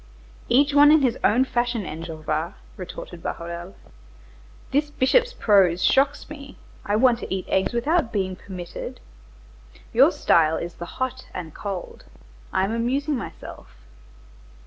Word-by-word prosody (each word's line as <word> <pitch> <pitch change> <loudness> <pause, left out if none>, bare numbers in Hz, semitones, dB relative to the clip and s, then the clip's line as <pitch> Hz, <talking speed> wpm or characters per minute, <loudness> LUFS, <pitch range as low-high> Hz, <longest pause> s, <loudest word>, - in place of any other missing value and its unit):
"Each 280 +3 +4
one 290 +1 +7
in 310 -2 +5
his 245 -3 +1
own 250 +5 +4
fashion, 240 -4 -1
Enjolras," 160 0 -4 0.2
retorted 180 -1 -8
Bahorel. 170 +3 -6 1.0
"This 290 +2 +1
bishop's 465 - +2
prose 195 - +3
shocks 275 +2 +2
me; 280 -2 -10 0.3
I 205 - 0
want 240 +1 +4
to - - -7
eat 190 -1 -2
eggs 190 - +1
without 245 +2 +1
being 190 -4 -1
permitted. 180 -2 -8 0.9
Your - - +6
style 160 -1 +3
is 170 0 -5
the 175 - -8
hot 260 0 -3
and 165 -4 -6
cold; 195 -3 -6 0.5
I 190 - +1
am 200 - -3
amusing 270 +6 0
myself. 240 - -9
225 Hz, 135 wpm, -24 LUFS, 180-270 Hz, 1.0 s, one